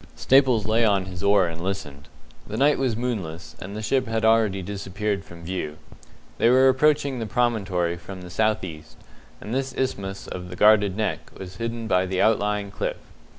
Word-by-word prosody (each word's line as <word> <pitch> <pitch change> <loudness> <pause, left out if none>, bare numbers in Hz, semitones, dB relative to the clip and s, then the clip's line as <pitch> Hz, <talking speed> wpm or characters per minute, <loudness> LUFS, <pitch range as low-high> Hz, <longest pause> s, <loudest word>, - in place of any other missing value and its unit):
Staples 130 -5 +4
lay 110 +2 +2
on 100 -4 +2
his 90 -1 -7
oar 100 -1 +4
and 85 -1 -5
listened. 75 -6 -5 0.4
The 110 - -5
night 145 +3 +3
was 130 -4 0
moonless, 85 -10 -4
and 100 +2 -7
the 110 - -5
ship 130 +2 +1
had 110 0 0
already 110 -4 +3
disappeared 100 +1 -3
from 85 -2 -13
view. 80 -4 -4 0.6
They 115 - +5
were 130 +2 +6
approaching 140 0 +2
the 115 - -3
promontory 100 -9 0
from 90 +2 -9
the 90 - -9
south 110 +1 +1
east, 75 -8 -9 0.4
and 110 - -6
this 130 -1 -2
isthmus 100 -7 -3
of 90 0 -7
the 90 - -7
guarded 105 -1 +4
Neck 110 - -2
was 95 0 -9
hidden 115 0 -4
by 95 -3 +2
the 95 0 -2
outlying 105 -2 +1
cliff. - - -3
105 Hz, 185 wpm, -24 LUFS, 90-115 Hz, 0.6 s, were